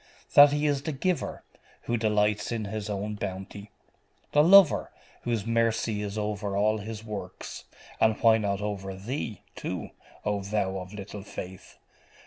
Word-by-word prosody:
That 145 0 +9
He 145 +1 0
is 145 -2 +1
the 155 +2 -3
giver, 180 +5 -2 0.4
who 120 - -1
delights 105 -1 +1
in 115 -2 -2
His 105 0 -4
own 105 +1 -2
bounty; 100 0 -6 0.6
the 150 - +5
lover, 190 -1 +7 0.3
whose 115 -4 -1
mercy 115 -2 +1
is 105 0 -4
over 105 -1 -2
all 110 +1 +2
His 110 +1 -7
works 100 -4 -7 0.3
and 110 -1 +3
why 115 -1 +5
not 100 -1 -1
over 100 -2 -4
thee, 110 +2 -5
too, - - -5 0.3
O 105 -1 0
thou 100 -1 -1
of 90 0 -9
little 105 0 -7
faith? 95 -2 -9
105 Hz, 150 wpm, -28 LUFS, 100-115 Hz, 0.6 s, That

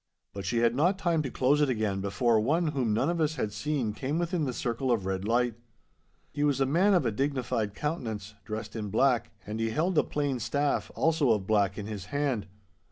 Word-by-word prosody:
But 100 -1 -6
she 120 - 0
had 115 0 +3
not 175 +9 +2
time 170 -4 +1
to 140 - -3
close 135 +4 +2
it 145 - +3
again 105 -5 0
before 110 +4 +2
one 155 +9 +1
whom 130 -7 0
none 105 - +1
of 170 -1 0
us 155 0 +1
had 105 -7 -2
seen 125 -1 -1
came 140 +7 -2
within 170 -2 0
the 130 - -1
circle 125 +1 -1
of 110 -6 +1
red 95 0 -2
light. 120 +1 +2 0.8
He 145 - -2
was 145 -2 +2
a 135 - +3
man 180 +9 +3
of 170 -7 +2
a 115 - +2
dignified 125 -4 -1
countenance, 110 - -4
dressed 110 0 -6
in 105 -2 -3
black, 120 +3 +2 0.2
and 105 +1 -5
he 115 0 0
held 160 +7 +1
a - - +3
plain 145 -3 -1
staff, 140 +4 0
also 160 -4 +2
of 105 -4 +2
black, 100 -2 +2
in 105 - -4
his 105 -3 -6
hand. 135 -5 -1
125 Hz, 220 wpm, -29 LUFS, 110-150 Hz, 0.8 s, had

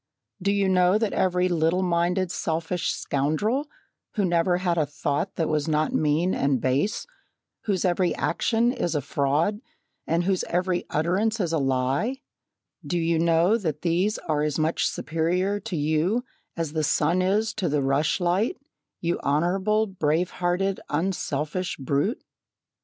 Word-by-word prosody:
Do 200 +2 +1
you 200 -1 +2
know 180 +1 +4
that 220 -1 -1
every 180 -1 +2
little 175 +1 +1
minded 175 +1 +1
selfish 165 0 -1
scoundrel, 205 - -1 0.5
who 205 -3 +2
never 175 0 +2
had 180 -1 0
a 155 -3 +1
thought 145 +5 -2
that 165 -3 0
was 155 -1 0
not 155 0 +1
mean 155 +5 +2
and 140 -2 +1
base 135 - 0 0.6
whose 195 -4 0
every 180 0 +1
action 235 +1 +1
is 170 - -2
a 150 - +1
fraud 145 - 0 0.5
and 170 +2 +1
whose 190 0 +1
every 180 +1 -1
utterance 195 +9 0
is 170 -4 -1
a 160 - +2
lie; 135 - 0 0.6
do 175 - -2
you 165 -1 +1
know 170 +6 +3
that 155 -7 -3
these 180 +5 +1
are 150 -2 -1
as 150 -1 0
much 160 +1 +1
superior 180 +5 -1
to 205 -2 -5
you 160 - +1 0.3
as 165 -3 -2
the 155 -1 0
sun 155 +4 +2
is 210 +4 +1
to 195 -6 -1
the 145 -1 +1
rush 140 +3 +1
light, 185 - +1 0.4
you 170 0 -1
honourable, 190 +9 +1
brave 175 -3 0
hearted, 185 +2 -1
unselfish 160 0 -2
brute? 140 - -1
175 Hz, 150 wpm, -25 LUFS, 155-190 Hz, 0.6 s, know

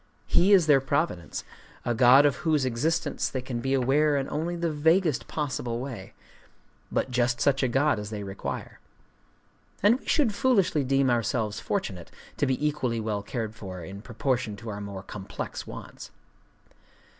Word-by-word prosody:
He 190 +4 +3
is 190 -5 +7
their 145 -3 +5
providence,—a 130 - -3
god 125 +4 +7
of 140 -3 +2
whose 155 -5 +1
existence 145 +6 0
they 130 -2 -4
can 125 -2 -4
be 135 +3 0
aware 140 +3 +3
in 135 -1 -1
only 165 +3 -2
the 170 -1 -1
vaguest 160 0 +2
possible 125 -5 -3
way, 120 -7 -7 0.8
but 130 - -1
just 120 0 +1
such 135 -1 +2
a 130 - +2
god 135 0 +2
as 105 0 -6
they 105 -2 -5
require. 95 -1 -6 1.0
And 225 +5 +5
we - - -20
should 275 -9 +2
foolishly 200 - +2
deem 135 0 +2
ourselves 115 -2 0
fortunate 95 - -3 0.3
to 145 - +1
be 135 +3 +1
equally 125 -6 -1
well 105 -2 -2
cared 110 +1 -4
for 95 -5 -8
in 95 +4 -8
proportion 120 -1 -2
to 110 +3 -8
our 105 -1 -5
more 100 -1 -6
complex 100 -1 -6
wants. - - -9
130 Hz, 160 wpm, -27 LUFS, 110-150 Hz, 1.0 s, is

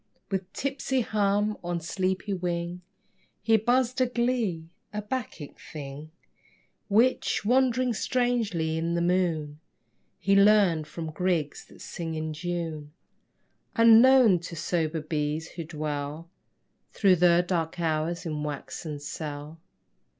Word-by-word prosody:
With 190 -1 -3
tipsy 270 -1 -1
hum 210 -1 0
on 175 0 -2
sleepy 185 +4 -2
wing 175 -1 -3 0.6
He 225 +1 +4
buzzed 245 +3 +2
a 255 - +4
glee 235 -10 -1 0.2
a 210 - -3
bacchic 210 - -5
thing 145 0 -8 0.8
Which, 225 +1 +2
wandering 255 +1 +2
strangely 220 -11 0
in 170 +1 -1
the 170 - 0
moon, 165 -5 0 0.6
He 195 0 +2
learned 195 -6 +4
from 160 +1 -6
grigs 170 -3 -1
that - - -17
sing 165 -2 -5
in 155 0 -3
June, 165 -2 -4 0.8
Unknown 230 -2 +7
to 170 0 -8
sober 160 -1 -1
bees 155 +1 -2
who 170 - -6
dwell 150 0 -4 0.7
Through 190 -3 +4
the 175 0 +4
dark 170 -2 -1
hours 165 +1 -1
in 155 -2 -3
waxen 150 +1 -5
cell. 150 +1 -7
175 Hz, 120 wpm, -27 LUFS, 155-210 Hz, 0.8 s, Unknown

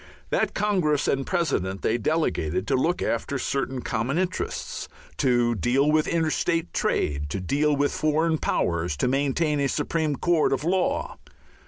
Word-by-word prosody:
That - - 0
congress 180 -9 +1
and 135 -1 0
president 100 - -1
they 115 +2 +1
delegated 100 - 0
to - - +1
look 165 +7 +1
after 130 +4 -1
certain 135 -1 -2
common 120 +7 -1
interests, 185 - -3 0.3
to 120 -3 +2
deal 130 - +2
with 155 0 +2
interstate 165 0 0
trade, 75 0 0
to 95 - -3
deal 145 - +1
with 145 0 +1
foreign 160 +1 +1
powers, 85 -3 0
to 70 - +1
maintain 145 +3 +1
a 140 - +2
supreme 150 +1 -1
court 165 0 +2
of 135 +1 -1
law. 180 +3 0
145 Hz, 150 wpm, -25 LUFS, 120-160 Hz, 0.3 s, to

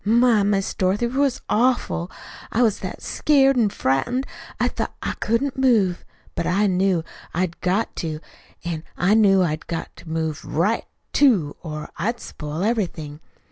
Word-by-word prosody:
My, 230 0 +4
Miss 200 -1 +1
Dorothy, 195 +5 +1
'twas 265 +1 0
awful. 230 -7 +1 0.4
I 240 - +3
was 220 -4 +2
that - - -6
scared 275 -2 +3
an' 230 -4 +3
frightened 200 - 0 0.3
I - - +3
thought - - -3
I - - -1
couldn't 250 +5 0
move. 215 -9 +3 0.3
But 170 - -2
I 200 +4 +2
knew 185 -3 +2 0.3
I'd 175 -1 -1
got 190 +5 0
to, 155 -2 -3 0.4
an' 165 -2 -3
I 185 +4 +3
knew 195 -4 +5
I'd 155 -3 -2
got 165 - -5
to 165 - -12
move 160 -1 -2
RIGHT, 190 +9 0 0.3
too, 205 - +3
or 155 -3 -6
I'd 230 +8 -1
spoil 150 -1 -5
everything. 175 -10 -2
195 Hz, 155 wpm, -23 LUFS, 165-235 Hz, 0.4 s, knew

